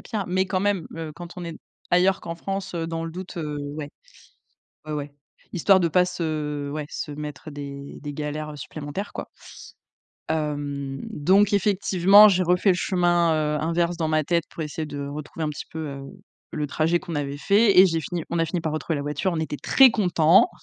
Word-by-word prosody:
a 215 -4 -3
pire, - - -8
mais 185 +1 +1
quand 185 -1 -1
même, 200 -4 0
heu, 160 -2 -5
quand 175 +2 -9
on 180 - -6
est 170 -1 -6 0.4
ailleurs 185 +2 +3
qu'en 165 - -5
France, 195 +2 -5
heu, 165 -1 -2
dans 165 0 -3
le 165 - -5
doute, 180 +2 -8
heu, 150 -3 -3 0.2
ouais. 150 -1 -6 1.0
Ouais, 155 - -5
ouais, 145 -1 -4 0.4
histoire 190 +2 +4
de 170 - +3
pas 180 +2 +4
se 155 -5 -3
ouais, 150 +1 -4
se 150 - -5
mettre, 150 0 -7
heu, - - -10
des 140 -1 -8
des 145 0 -6
galères 150 0 -5
supplémentaires, 150 +8 -6
quoi. - - -6 1.0
Hem, 145 -3 -3
donc 195 +7 +3
effectivement, 200 0 +6
j'ai 185 -2 +3
refait 180 +3 +3
le - - +4
chemin, 175 -2 +2 0.2
heu, - - -2
inverse 170 +2 0
dans 160 -1 -1
ma 155 0 +2
tête 170 +2 0
pour 165 - -6
essayer 155 +1 -4
de 145 -1 -5
retrouver 150 +3 -6
un - - 0
petit 150 - -7
peu, 160 - -7
heu, 140 -1 -7 0.5
le 150 -1 -2
trajet 160 +4 +1
qu'on 170 - -7
avait 145 -1 -2
fait 200 +4 +4
et 190 - +10
j'ai 165 -2 0
fini 165 +2 -4
on 170 - -2
a - - +3
fini 170 +2 -2
par 160 -1 -2
retrouver 155 +1 -2
la 140 - -3
voiture, 150 +6 -1
on 165 - -2
était 155 -2 -3
très 265 - +6
contents, 180 - +4
165 Hz, 210 wpm, -24 LUFS, 150-180 Hz, 1.0 s, et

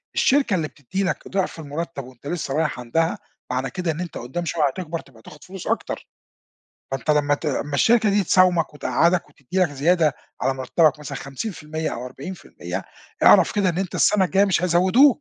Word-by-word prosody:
الشركة 265 -6 +3
اللي 160 -4 -1
بتدِّي 165 +9 -4
لك 190 - -2
ضعف 190 -3 -2
المُرتّب 150 -1 -5
وأنت 130 +2 -13
لسّه 155 -4 -3
رايح 155 -4 0
عندها، 160 +8 0 0.3
معنى 130 +1 -1
كده 180 -3 -2
إن 155 - -6
أنت 175 - -6
قُدّام 135 +9 -4
شويّة 165 -1 0
هتكبر 165 +3 -4
تبقى 120 -7 -17
تاخد 150 +6 -14
فلوس 190 -1 -9
أكتر، - - -2 0.8
فأنت 135 +1 -1
لمّا 145 -1 +3
ت 155 - -7
لمّا 145 0 -2
الشركة 225 - +4
دي 200 0 +2
تساومك 180 -3 +3
وتقعّدك 170 +4 +1
وتدّي 145 +7 -6
لك 180 - +4
زيادة، 155 +1 +2 0.3
على 135 +1 +1
مرتبك 145 +3 +2
مثلًا 145 -2 -6
50% 155 - -5
أو 125 +2 -6
40% 140 +9 -7 0.4
أعرف - - +7
كده 200 -3 +2
إن 170 - -1
أنت 190 -2 -3
السنة 200 -2 +4
الجايّة 195 +2 +3
مش 185 -2 +1
هيزودوك. 185 - +5
165 Hz, 180 wpm, -23 LUFS, 140-185 Hz, 0.8 s, أعرف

